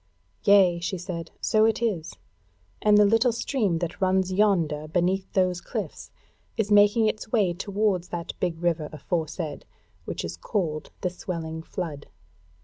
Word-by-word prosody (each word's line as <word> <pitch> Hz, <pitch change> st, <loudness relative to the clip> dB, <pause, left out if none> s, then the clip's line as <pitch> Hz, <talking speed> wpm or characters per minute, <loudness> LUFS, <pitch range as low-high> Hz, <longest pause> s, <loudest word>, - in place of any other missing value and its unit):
"Yea," 195 Hz, -4 st, +6 dB
she 185 Hz, +2 st, -3 dB
said, 170 Hz, -2 st, -6 dB
"so 215 Hz, 0 st, +3 dB
it 225 Hz, 0 st, +3 dB
is, 185 Hz, -, -2 dB, 0.7 s
and 210 Hz, -1 st, +5 dB
the 210 Hz, -, +7 dB
little 225 Hz, +4 st, +4 dB
stream 225 Hz, -6 st, 0 dB
that 170 Hz, +2 st, -4 dB
runs 185 Hz, 0 st, +2 dB
yonder 170 Hz, -7 st, +2 dB
beneath 180 Hz, +4 st, 0 dB
those 185 Hz, -2 st, +1 dB
cliffs, -, -, -5 dB, 0.5 s
is 215 Hz, -2 st, 0 dB
making 205 Hz, +2 st, +6 dB
its 215 Hz, 0 st, -2 dB
way 200 Hz, -7 st, +2 dB
towards 195 Hz, -1 st, -1 dB
that 170 Hz, 0 st, -5 dB
big 170 Hz, -3 st, -1 dB
river 165 Hz, -3 st, 0 dB
aforesaid, 155 Hz, 0 st, -3 dB, 0.4 s
which -, -, -4 dB
is 85 Hz, 0 st, -6 dB
called 155 Hz, -, -2 dB
the 180 Hz, -, 0 dB
Swelling 165 Hz, -3 st, -5 dB
Flood. 160 Hz, -4 st, -6 dB
180 Hz, 145 wpm, -26 LUFS, 165-205 Hz, 0.7 s, the